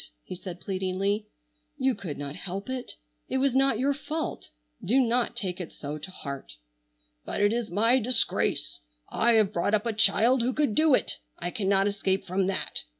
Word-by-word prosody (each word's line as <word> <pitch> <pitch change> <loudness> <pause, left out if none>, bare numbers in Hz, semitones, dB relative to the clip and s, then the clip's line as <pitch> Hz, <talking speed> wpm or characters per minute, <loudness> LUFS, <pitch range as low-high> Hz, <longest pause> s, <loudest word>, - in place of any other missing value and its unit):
he - - -7
said 180 -1 -7
pleadingly. 195 +3 -1 0.5
"You 260 0 +2
could 170 -10 -6
not 145 0 -5
help 195 +6 -4
it. 255 -1 -4 0.4
It - - 0
was 270 -1 +2
not 270 -3 +3
your 275 +4 +2
fault. 305 +2 -4 0.3
Do 250 +7 +3
not 245 -1 +2
take 185 -2 -3
it 170 - -7
so 150 +1 -6
to 155 - -8
heart!" 140 -7 -7 0.7
"But - - -4
it 205 +1 +3
is 235 -2 -2
my 230 +8 +4
disgrace. 240 0 +1 0.3
I 235 +1 +3
have 215 -2 +3
brought 200 +4 +2
up 210 - -1
a 230 - 0
child 225 +4 +4
who 250 +2 0
could 295 -7 +1
do 310 +2 +5
it. - - -1 0.2
I 175 +1 -3
cannot 195 -1 +2
escape 195 -1 0
from 185 +1 0
that. 195 - -1
205 Hz, 185 wpm, -27 LUFS, 185-245 Hz, 0.7 s, do